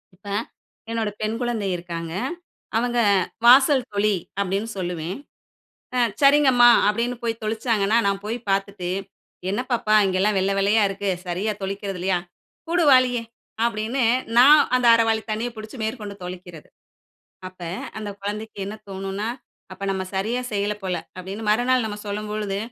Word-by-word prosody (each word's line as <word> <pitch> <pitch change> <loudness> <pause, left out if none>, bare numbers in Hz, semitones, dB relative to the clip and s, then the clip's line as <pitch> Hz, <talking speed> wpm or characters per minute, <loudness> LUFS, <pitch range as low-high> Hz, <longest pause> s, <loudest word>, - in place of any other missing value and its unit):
இப்ப, 200 +2 -17 0.6
என்னோட 225 -2 -1
பெண் 215 +1 -1
குழந்தை 230 -5 -1
இருக்காங்க, 170 -1 -6 0.6
அவங்க 240 +1 0 0.5
"வாசல் 265 +1 +7
தொளி!" 205 0 +2 0.2
அப்பிடின்னு 200 +3 -1
சொல்லுவேன், 175 +1 -3 0.8
"அ - - +2 0.2
சரிங்கம்மா!" 275 -4 +6 0.2
அப்பபிடின்னு 235 +3 -1
போய் 230 -1 -2
தொளிச்சாங்கன்னா, 220 -1 +1
நான் 200 0 -1
போய் 230 +3 -2
பார்த்துட்டு, 195 -2 -2 0.6
"என்ன 210 - -1
பாப்பா, 215 -2 +2
இங்கேல்லாம் 190 +2 +1
வெள்ள, 195 +1 +1
வெள்ளையா 205 +2 +3
இருக்கு. 200 0 -3 0.2
சரியா 195 +5 -1
தொளிக்கிறது, 195 -1 -4
இல்லையா? 185 -1 +1 0.5
குடு 340 -2 +2
வாளிய", 255 -2 +5 0.4
அப்பபிடின்னு 235 +2 0 0.3
நான் 290 +5 +9 0.2
அந்த 250 -1 +1
1/2 230 0 +3
வாளி 220 0 +1
தண்ணிய 225 +3 -2
பிடிச்சு, 215 +4 -9
மேற்கொண்டு 215 -3 -5
தொளிக்கிறது. 180 -3 -9 0.8
அப்ப, 185 -1 -15 0.4
அந்த 210 -1 -5
குழந்தைக்கு 210 +1 -5
என்ன 210 +2 -5
தோணும்னா, 195 +2 -4 0.4
"அப்ப 185 - -11
நம்ம 190 -1 -2
சரியா 225 +6 -1
செய்யல 205 +1 0
போல" 185 -1 -1
அப்பபிடின்னு. 195 +4 -7
மறுநாள் 245 +2 +2
நம்ம 210 -1 -4
சொல்லும்பொழுது, 210 -1 -3
210 Hz, 135 wpm, -23 LUFS, 195-235 Hz, 0.8 s, நான்